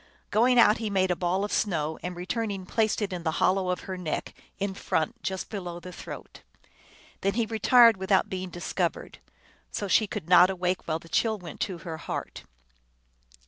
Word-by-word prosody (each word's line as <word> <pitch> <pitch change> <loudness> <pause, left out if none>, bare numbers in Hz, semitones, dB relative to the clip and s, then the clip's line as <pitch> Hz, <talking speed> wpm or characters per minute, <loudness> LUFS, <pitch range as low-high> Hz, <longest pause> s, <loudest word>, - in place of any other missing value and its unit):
Going 245 +4 +4
out 225 -2 +6
he 220 -2 -2
made 190 -2 +2
a - - +2
ball 180 +3 0
of 205 - -6
snow, 160 -6 0
and 180 0 -5
return 210 +6 -2
ing 195 -2 -5
placed 220 +2 +1
it 195 -2 -3
in 180 - -4
the 160 -1 -1
hollow 185 0 +2
of 180 - -1
her 185 -1 -6
neck, 160 -4 -3 0.2
in 200 0 -2
front, 160 -4 -2
just 190 -1 -4
below 180 -5 -5
the 180 +2 -9
throat. - - -9 0.8
Then 195 +1 0
he 230 -1 +1
retired 230 0 +5
without 190 0 +2
being 185 -1 -4
dis 175 0 -6
covered. - - -2 0.5
So 205 - -3
she 215 +3 +3
could 155 - -6
not 180 +1 +7
awake, 185 -1 -2
while 160 -1 0
the 165 - -15
chill 220 +5 +1
went 175 -6 -10
to 185 -4 -2
her 165 -2 -4
heart. 160 - -6
190 Hz, 195 wpm, -27 LUFS, 175-210 Hz, 0.8 s, not